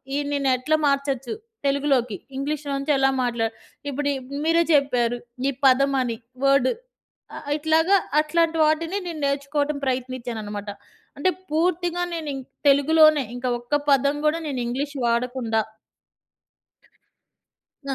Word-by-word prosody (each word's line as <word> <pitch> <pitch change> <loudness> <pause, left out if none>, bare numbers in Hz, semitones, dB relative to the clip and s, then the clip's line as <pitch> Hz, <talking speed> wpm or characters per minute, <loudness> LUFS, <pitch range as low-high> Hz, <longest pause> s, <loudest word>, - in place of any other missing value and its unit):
ఈ - - +1 0.2
నేను 280 -1 +1
ఎట్లా 310 +5 +1
మార్చొచ్చు 275 - -1 0.3
తెలుగులోకి. 275 -6 +1 0.2
ఇంగ్లీష్‌లో 285 +1 -3
నుంచి 275 +2 -1
ఎలా 270 0 +4
మాట్లాడ 235 -2 -1 0.4
ఇప్పుడు 285 +1 -2
ఇవి 270 +2 -6
మీరే 335 +1 +4
చెప్పారు. 245 -4 +2 0.3
ఈ - - 0 0.2
పదం 275 +2 +4
అని. 235 -3 -2 0.3
వర్డ్. 275 -2 +4 0.7
ఆహ్, - - -9
ఇట్లాగా 320 +5 +3 0.2
అట్లాంటి 330 +1 +1
వాటిని 325 +5 0
నేను 330 -3 -5
నేర్చుకోవటం 285 +1 -1
ప్రయత్నిచ్చానన్నమాట. 240 -5 -4 0.5
అంటే 330 +6 +2 0.2
పూర్తిగా 350 +2 0
ఇం 350 - -8
నేను 320 -2 -4
ఇంకా 265 -1 -8 0.2
తెలుగులోనే 305 +1 +5
ఇంకా. 245 +1 -3
ఒక్క 240 +4 -4 0.2
పదం 280 +1 +3
గూడా 305 +2 +2
నేను 270 -4 -3
ఇంగ్లీష్ 280 +4 -3
వాడకుండా. 235 -1 0 2.3
ఆ! 270 - 0
280 Hz, 125 wpm, -23 LUFS, 255-305 Hz, 2.3 s, తెలుగులోనే